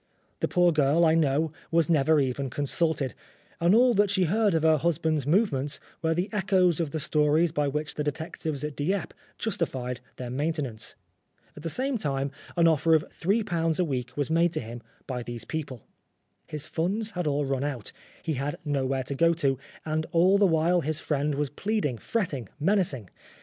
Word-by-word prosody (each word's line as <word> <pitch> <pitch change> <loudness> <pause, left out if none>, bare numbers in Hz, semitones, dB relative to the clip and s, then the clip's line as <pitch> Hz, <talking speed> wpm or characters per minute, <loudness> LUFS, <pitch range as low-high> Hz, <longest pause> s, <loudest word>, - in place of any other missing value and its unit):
The - - +1
poor 175 -1 +4
girl, 155 +2 +3
I 160 - +4
know, 155 0 +2 0.2
was 165 -2 +3
never 155 -1 +4
even 135 0 -1
consulted, 145 -1 0 0.5
and 170 +4 +4
all 245 +1 +5
that 205 -1 +3
she 190 -1 +2
heard 205 +2 +2
of 160 - +1
her 160 -1 +5
husband's 160 -2 0
movements 150 -6 +1 0.2
were 160 0 +1
the 180 +3 0
echoes 190 -4 +2
of 165 -3 0
the 155 - -3
stories 150 +2 +2
by 150 -2 0
which 150 +2 -2
the 150 - -2
detectives 155 0 -4
at 150 -2 -4
Dieppe 180 +5 -1 0.2
justified 130 - -3
their 125 -1 -6
main 145 +6 0
tenance. 125 -9 -4 0.6
At 150 - -10
the 165 - -3
same 260 - 0
time, 140 -3 -1 0.3
an 170 -1 +5
offer 160 +1 +4
of 155 - +1
^3 175 -5 0
a - - +4
week 130 -6 -3
was 145 +1 -1
made 170 +1 +3
to - - -1
him 120 +1 -7 0.2
by 125 -2 -4
these 120 -1 -7
people. 145 -7 -5 0.6
His 150 -2 -4
funds 205 +7 -1
had 180 -5 -2
all 145 0 +1
run 135 0 -1
out, 135 -7 -4 0.3
he 160 - -1
had 140 +2 -2
nowhere 135 -2 0
to 135 - -4
go 165 +4 +3
to, 135 -5 +1 0.3
and 155 0 -1
all 185 +4 +4
the 200 - +5
while 170 +1 +3
his 155 0 -1
friend 145 -1 -1
was 145 -1 -1
plead 210 +6 -1
ing, 125 -6 -2
fretting, 150 - -2
menacing. 155 - 0
155 Hz, 190 wpm, -27 LUFS, 140-170 Hz, 0.6 s, all